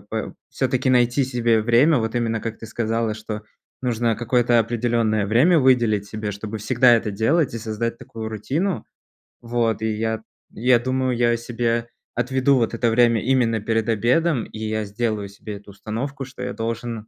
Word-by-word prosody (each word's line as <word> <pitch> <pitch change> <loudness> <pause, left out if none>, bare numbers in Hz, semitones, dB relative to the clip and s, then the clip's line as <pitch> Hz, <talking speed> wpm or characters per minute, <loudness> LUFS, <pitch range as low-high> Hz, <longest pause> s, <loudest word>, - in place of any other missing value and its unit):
п - - -4 0.2
всё-таки 130 - 0
найти 125 +2 +3
себе 120 -3 +1
время, 125 +7 +4
вот 110 0 -2
именно 115 -2 0
как 115 0 -5
ты 115 - -9
сказала, 115 0 -1
что 110 0 -6 0.4
нужно 120 -2 0
какое-то 120 0 +2
определённое 115 -2 +1
время 135 - +4
выделить 120 -6 +3
себе, 105 0 -4
чтобы 105 +2 -6
всегда 120 +3 +4
это 115 -2 0
делать 125 +8 +1
и 115 - -3
создать 115 +1 -3
такую 110 -1 -7
рутину. 135 - -2 0.6
Вот, 115 -2 -1
и 110 0 0
я 110 +1 -2 0.3
я 120 +1 +3
думаю, 130 +1 0
я 120 0 +2
себе 115 0 -1 0.3
отведу 130 +3 +2
вот 115 -1 0
это 115 0 +1
время 115 0 +3
именно 120 -3 +2
перед 115 0 0
обедом, 120 +5 +2
и 110 - -10
я 110 0 -2
сделаю 105 -1 -2
себе 100 +1 -8
эту 100 0 -14
установку, 125 +7 -5
что 135 +2 -11
я - - -3
должен, 115 -1 -4
115 Hz, 170 wpm, -22 LUFS, 110-125 Hz, 0.6 s, время